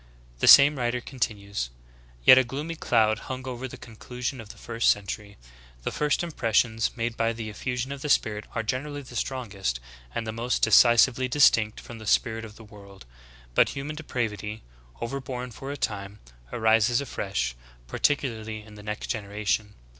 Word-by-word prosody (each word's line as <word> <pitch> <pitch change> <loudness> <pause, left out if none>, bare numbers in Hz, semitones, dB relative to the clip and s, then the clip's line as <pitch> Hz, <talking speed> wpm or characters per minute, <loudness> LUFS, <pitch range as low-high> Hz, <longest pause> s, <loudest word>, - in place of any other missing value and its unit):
The - - +1
same 140 0 +9
writer 120 0 0
continues: 100 - -3 0.6
"Yet 130 - +10
a - - +4
gloomy 145 +7 -5
cloud 110 -8 +2
hung 130 0 -5
over 130 +1 -4
the - - -10
con 115 - -13
clusion 125 +2 -5
of 105 - -13
the - - -11
first 115 0 0
century. 100 +1 -2 0.5
The - - -2
first 150 +3 0
impressions 115 -7 0
made 115 0 -2
by 115 0 +1
the 110 -1 -6
effusion 125 +4 -3
of 140 -1 -6
the 150 - -4
Spirit 105 -5 +1
are 115 - -1
generally 145 +5 -3
the 125 -2 -12
strongest 105 - -3 0.4
and 115 - -2
the 110 - -3
most 115 +3 -2
decisively 120 +2 +6
distinct 115 -5 +4
from 120 -1 -10
the 110 - -9
spirit 115 +1 +1
of 105 -1 -12
the 115 - -13
world. 100 - -14 0.5
But - - +4
human 145 +3 -5
depravity, 110 -7 -4 0.4
over 135 +4 -4
born 125 -1 -5
for 135 +4 -7
a 145 - -5
time, 100 -4 -3 0.3
arises 110 +2 +3
afresh, 95 - -2 0.3
par - - -7
ticularly 110 -7 -1
in 105 - -14
the 105 - -11
next 105 0 -5
generation. 105 0 -2
115 Hz, 175 wpm, -26 LUFS, 105-130 Hz, 0.6 s, Yet